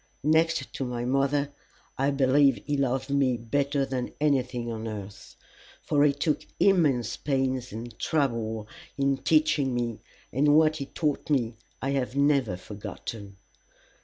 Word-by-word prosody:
Next 160 +2 +2
to - - -3
my 120 -1 -3
mother, 140 +2 +1 0.4
I 135 +1 +1
believe 140 0 +3
he 145 - 0
loved 135 0 -1
me 135 -3 +2
better 140 +4 0
than 130 -2 -4
anything 125 -5 0
on 110 0 -5
earth, 100 -2 -8 0.5
for 145 -1 +2
he 150 - +5
took 145 +2 -1 0.2
immense 155 - +3
pains 130 -3 -1
and 115 +2 -7
trouble 115 -8 -1 0.3
in 140 -1 +2
teaching 150 -4 +2
me, 120 -2 -2 0.3
and 145 +3 +4
what 155 0 +4
he 140 -2 -5
taught 150 -1 -2
me 120 -6 +1 0.3
I 135 - 0
have 135 -2 -1
never 140 -9 +2
forgotten. 100 0 -8
135 Hz, 140 wpm, -27 LUFS, 120-145 Hz, 0.5 s, he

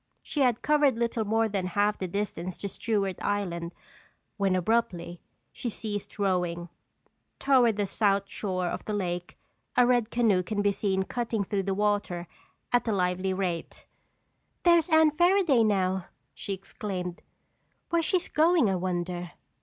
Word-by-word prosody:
She 295 - -4
had 245 -3 +2
covered 290 -4 +3
little 235 -1 0
more 225 +2 +2
than 195 -3 -2
half 210 +1 +2
the 185 - -2
distance 185 -2 -3
to 200 - -4
Stewart 200 -1 -2
Island, 175 -5 -2 0.6
when 195 -3 +1
abruptly, 180 -3 -1 0.3
she 240 - -4
ceased 205 -2 -5
rowing. 180 -3 -1 0.7
Toward 255 -5 +4
the 205 0 0
south 200 0 +1
shore 185 -2 -3
of 175 - -3
the 210 - -2
lake, 175 -3 -3 0.4
a 245 - +7
red 240 -2 +2
canoe 225 -7 +3
could 205 +2 -2
be 205 - +3
seen 190 -1 0
cutting 225 -1 -2
through 200 0 -1
the 190 - 0
water 205 -4 0 0.5
at 245 0 +3
a - - +2
lively 185 -1 0
rate. 185 -3 -3 0.8
"There's 340 -1 +5
Anne 315 -1 +5
Fairaday 345 - +4
now!" 190 -3 +1 0.3
she 200 - -5
exclaimed. 190 -2 -5 0.7
"Where's 335 -1 +2
she 365 +1 +2
going, 315 - +4
I 190 - 0
wonder?" 175 -1 -3
205 Hz, 150 wpm, -28 LUFS, 185-235 Hz, 0.8 s, a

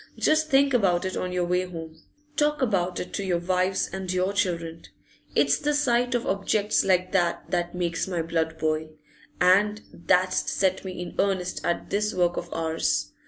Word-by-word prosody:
Just 310 0 +2
think 275 -1 +4
about 190 -7 +2
it 185 - -3
on 180 - -3
your 180 -1 0
way 180 +1 +1
home; 165 -3 -9 0.3
talk 295 0 +1
about 185 -6 0
it - - -6
to 200 - -2
your 180 -2 0
wives 185 +2 0
and 190 -1 -3
your 185 +2 0
children. 170 -5 -1 0.5
It's - - +3
the 295 0 0
sight 245 -3 +2
of 240 - -1
objects 205 +2 +1
like 185 -1 +2
that 175 -3 0
that 175 0 -1
makes 175 -1 -1
my 175 -3 -2
blood 160 -1 -1
boil, 155 0 -1 0.5
and 205 +4 +3
that's 185 +1 +1
set 190 -1 +1
me 185 -2 -6
in 180 - -6
earnest 190 -2 0
at 170 - -2
this 210 +1 0
work 175 -1 +2
of - - -5
ours. 165 0 -1
185 Hz, 180 wpm, -26 LUFS, 175-200 Hz, 0.5 s, think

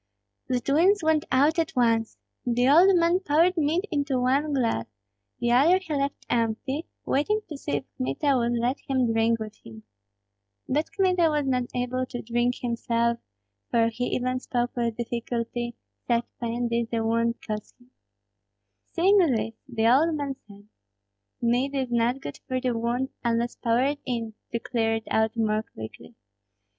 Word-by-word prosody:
The 255 -1 +1
twins 340 +10 +3
went 315 -1 +2
out 290 +6 +3
at 325 - -1
once. 230 -2 +2 0.3
The 245 +1 +2
old 350 +7 +7
man 340 +1 +3
poured 345 +1 +3
mead 325 +4 +1
into 285 -4 0
one 275 +4 +1
glass; 230 - 0 0.5
the 240 0 0
other 295 +9 +5
he 370 -5 -5
left 280 -1 -2
empty, 240 +7 -1 0.2
waiting 420 +11 +1
to 305 - -5
see 275 - -5
if 145 -1 0
Kmita 135 - 0
would 240 -1 +1
let 245 +4 0
him 255 -4 +1
drink 225 +1 +2
with 215 -1 -6
him. 110 -1 -12 0.8
But 300 +4 0
Kmita 365 -4 +3
was 295 -2 0
not 250 -2 +1
able 250 +1 -1
to 245 -2 -6
drink 240 +2 0
himself, 235 -1 0 0.5
for 230 -1 +3
he 245 +2 -3
even 255 0 -1
spoke 245 -1 -2
with 235 -2 -1
difficulty, 235 0 -3 0.3
such 235 -1 +2
pain 235 0 -1
did 235 0 -1
the 225 -1 -1
wound 230 +1 +1
cause 215 -1 -5
him. 245 +1 -24 1.0
Seeing 390 +4 +4
this, 225 - +1 0.2
the 225 -2 +1
old 305 +7 +4
man 285 -2 -3
said, 205 0 -15 0.8
"Mead 250 +4 +1
is 260 -2 -1
not 240 +3 +1
good 145 - -7
for 255 -1 -1
the 250 -2 -1
wound, 240 +3 -1
unless 235 0 0
poured 255 +5 +1
in, 230 -3 -2 0.2
to 235 - 0
clear 225 -1 0
it 225 - -5
out 220 +1 +1
more 215 -1 +1
quickly. 110 - -11
245 Hz, 165 wpm, -26 LUFS, 230-280 Hz, 1.0 s, old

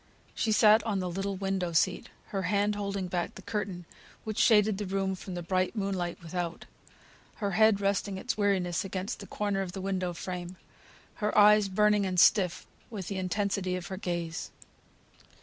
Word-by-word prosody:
She 220 - 0
sat 215 +1 +6
on 215 -3 -1
the 180 -1 -2
little 195 +2 -2
window 190 -2 -2
seat, 180 +3 +1 0.2
her 195 - -2
hand 200 +3 +1
holding 200 -2 -3
back 175 -1 -3
the - - -11
curtain 190 -5 -4 0.4
which 215 -1 -4
shaded 210 -3 +4
the 205 - -3
room 195 0 -1
from 185 0 -7
the 175 - -4
bright 185 +4 0
moonlight 190 -4 -2
without; 170 0 -4 0.7
her 200 -2 -2
head 215 +1 +4
resting 200 -1 0
its 245 - -2
weariness 190 -4 +1
against 195 +3 -4
the 200 - -9
corner 205 -2 -1
of 180 -2 -5
the 195 - -5
window 185 -2 -1
frame; 180 +1 -6 0.6
her 210 -1 -1
eyes 210 0 +7
burning 210 +1 +3
and 180 -1 0
stiff 185 -2 +4 0.2
with 195 -6 -6
the 195 - -3
intensity 190 0 -1
of 180 -1 -5
her 190 - -5
gaze. 170 -3 -3
195 Hz, 175 wpm, -29 LUFS, 180-205 Hz, 0.7 s, eyes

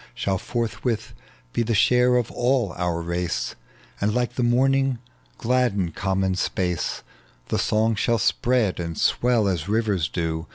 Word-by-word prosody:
Shall 95 +6 -1
forthwith 115 0 -3 0.4
he 120 - +1
tlie 115 0 0
share 125 +3 +4
of 120 -2 -1
all 120 -5 +1
our 90 -1 -1
race, 85 0 -2 0.5
And 105 +2 +1
lilie 125 -1 +1
the 125 - -2
morning 135 +2 +2 0.4
gladden 115 -8 +1
common 95 +1 0
space: 90 -2 -2 0.5
The - - 0
song 110 +1 +2
shall 115 +2 +1
spread 120 -2 +1
and 85 -2 -4
swell 120 -4 +2
as 90 -2 -2
rivers 105 -7 +1
do. 80 -2 -3
110 Hz, 140 wpm, -24 LUFS, 90-120 Hz, 0.5 s, share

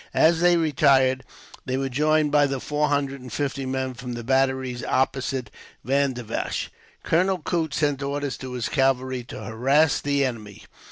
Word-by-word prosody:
As 160 +1 +4
they 175 0 +4
retired, 130 -4 +3 0.4
they 130 0 0
were 135 0 -1
joined 150 +3 +2
by 145 -1 +4
the 135 -1 -3
four 150 +3 0
hundred 140 -2 -1
and 125 -1 -10
fifty 135 +1 -2
men 130 0 -2
from 125 0 -7
the 120 0 -6
batteries 130 -1 0
opposite 130 -3 -1 0.3
Vandivash. 130 -4 -1 0.3
Colonel 185 +3 +2
Coote 160 -2 -2
sent 145 -2 0
orders 140 0 -2
to 130 -1 -7
his 120 -3 -2
cavalry 130 +1 0
to - - -8
harass 135 +7 +2
the 140 -1 +1
enemy. 105 -4 -6
135 Hz, 160 wpm, -24 LUFS, 130-145 Hz, 0.4 s, As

